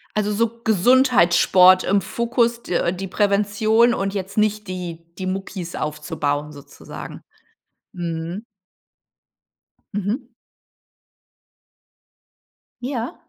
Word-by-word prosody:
Also, 210 0 0
so 230 +2 -1
Gesundheitssport 185 -5 +5
im 200 +1 +2
Fokus, 235 +3 0
d 170 -1 0
die 195 +1 -5
Prävention 210 +4 +2
und 195 -2 -2
jetzt 195 +1 -5
nicht 210 -1 +1
die 175 -3 -6
die 185 - -4
Muckis 185 -2 -5
aufzubauen 150 -1 -3
sozusagen. 145 -2 -10 0.7
Mhm. 170 +3 -5 1.5
Mhm. 215 +6 -3 2.5
Ja. 245 -2 -4
200 Hz, 85 wpm, -21 LUFS, 175-225 Hz, 2.5 s, Gesundheitssport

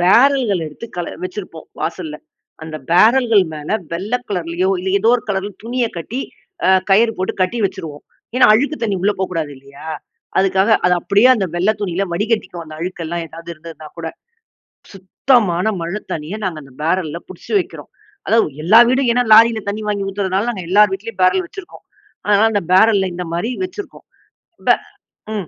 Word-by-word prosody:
Barrel 260 +9 +5
கள் 180 -5 0
எடுத்து 155 +10 -9
கல 175 - -4
வச்சிருப்போம் 180 -3 -7
வாசல்ல. 160 -2 -4 0.5
அந்த 160 -1 -6
பேரல்கள் 225 +2 +5
மேல 150 0 -7 0.2
வெள்ள 195 +7 -4 0.2
கலர்லயோ, 180 -1 -1
இல்ல 190 +1 -2
எதோ 225 +4 +3
ஒரு 230 - -8
கலர்ல 195 +1 -2
துணிய 240 0 0
கட்டி 235 +10 -4 0.5
அ - - +4 0.2
கயிறு 225 +3 +5
போட்டு 185 - -1
கட்டி 210 +6 -1
வச்சுருவோம். 155 -6 -5 0.3
ஏன்னா, 255 - +6
அழுக்கு 285 +6 +1
தண்ணி 205 -4 0
உள்ள 205 +1 +3
போக்கூடாது 165 -5 -2
இல்லையா? 140 +3 -12 0.5
அதுக்காக. 190 +2 +2 0.2
அது 180 - +4
அப்படியே 205 +8 +4
அந்த 195 -5 -1
வெள்ள 185 +5 +2
துணியில 195 0 -1
வடிகட்டிக்குவோம். 195 -4 -2
அந்த 155 0 -10
அழுக்கு 180 -1 -4
எல்லாம் 170 +1 -3
ஏதாவது 165 +2 -12
இருந்ததுன்னாகூட. 160 0 -9 1.1
சுத்தமான 215 -8 +3
மழை 175 +6 -3
தண்ணிய 160 +6 -4
நாங்க 170 -4 -3
அந்த 135 -2 -17
பேரல்ல 165 -1 0
புடிச்சு 185 - -9
வைக்கிறோம். - - -7 0.4
அதாவது 185 -11 +2
எல்லா 215 +8 +7
வீடும், 260 -1 +2
ஏன்னா 245 +1 +2
லாரில 225 0 +6
தண்ணி 210 +2 -4
வாங்கி 200 -1 -1
ஊத்துறனால 195 +2 -1
நாங்க 190 -5 -6
எல்லார் 205 +1 +5
வீட்லயும் 200 0 -6
பேரல் 365 - +3
வச்சுருக்கோம். 390 -1 -11 0.4
அதனால 210 +2 +4
அந்த 205 - 0
பேரல்ல 195 -1 +4
இந்தமாரி 175 +4 -3
வச்சுருக்கோம். 370 +3 -8 0.6
ப - - +4 0.7
ம். 190 -6 -4
190 Hz, 160 wpm, -18 LUFS, 170-225 Hz, 1.1 s, எல்லா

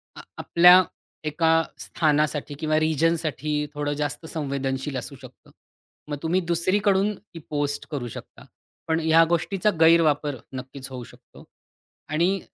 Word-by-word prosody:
आ - - -9 0.2
आपल्या 180 +2 +6 0.4
एका 160 +2 +1 0.3
स्थानासाठी 150 -2 0
किंवा 155 -1 +1
रिजनसाठी 155 -2 0
थोडं 145 0 -2
जास्त 145 +2 -4
संवेदनशील 140 -3 -3
असू 140 +3 -6
शकतं. 130 -1 -15 0.6
मग 145 - -3
तुम्ही 170 +3 +1
दुसरीकडून 190 +4 +1
ती 185 -4 -14
पोस्ट 145 -1 -2
करू 135 -5 -3
शकता. 115 - -11 0.4
पण 160 0 +1
ह्या 160 0 +5
गोष्टीचा 180 +4 +1
गैरवापर 155 -3 +4 0.2
नक्कीच 130 +1 -7
होऊ 130 -2 -7
शकतो. - - -16 0.7
आणि 175 +6 +1
155 Hz, 125 wpm, -24 LUFS, 145-170 Hz, 0.7 s, आपल्या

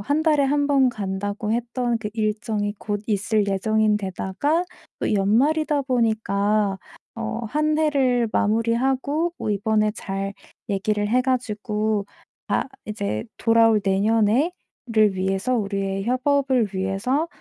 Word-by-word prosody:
1 285 +9 0
달에 305 -3 +3
1 285 +1 +2
번 275 -2 +4
간다고 205 0 -3
했던 240 +1 -1
그 215 -1 -4
일정이 215 -1 -1
곧 205 -1 -3
있을 210 0 +1
예정인 215 +2 +2
데다가 210 - -1 0.3
또 - - -1
연말이다 280 +9 +2
보니까 215 -5 +1 0.4
어 230 0 -4
한 305 +5 0
해를 265 -6 +2
마무리하고 260 +9 +1
뭐 - - -2
이번에 215 +1 +1
잘 195 -1 -4 0.4
얘기를 205 +1 0
해 250 +4 +3
가지고 215 -4 -1 0.4
아 - - +1 0.2
이제 200 - -3
돌아올 225 -1 +4
내년에 215 - +2 0.4
를 215 -4 +3
위해서 195 +6 0
우리의 195 -2 -2
협업을 260 -1 +1
위해서 195 - 0
220 Hz, 250 characters per minute, -23 LUFS, 205-255 Hz, 0.4 s, 번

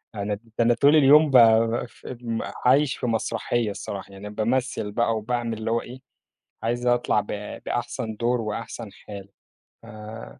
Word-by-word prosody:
أنا، 105 0 -2
ده 115 +3 -9
أنا 120 +1 +4
طول 140 +5 +4
اليوم 150 +1 +6
بب 115 -1 +5 0.8
عايش 135 +2 +4
في - - -4
مسرحية 115 0 -1
الصراحة، 100 0 -7
يعني 100 +1 -8
بامثل 115 0 -1
بقى 115 +1 +1
وباعمل 115 +1 -2
اللي 110 +1 -3
هو 115 - +1
إيه؟ 125 +2 -10 0.6
عايز 120 +2 -1
أطلع 120 -3 +2
ب - - -15 0.4
بأحسن 110 -1 -3
دور 120 +2 0
وأحسن 110 0 -5
حال. 100 -2 -10 0.6
آآ، 105 - -10
115 Hz, 145 wpm, -24 LUFS, 105-120 Hz, 0.8 s, اليوم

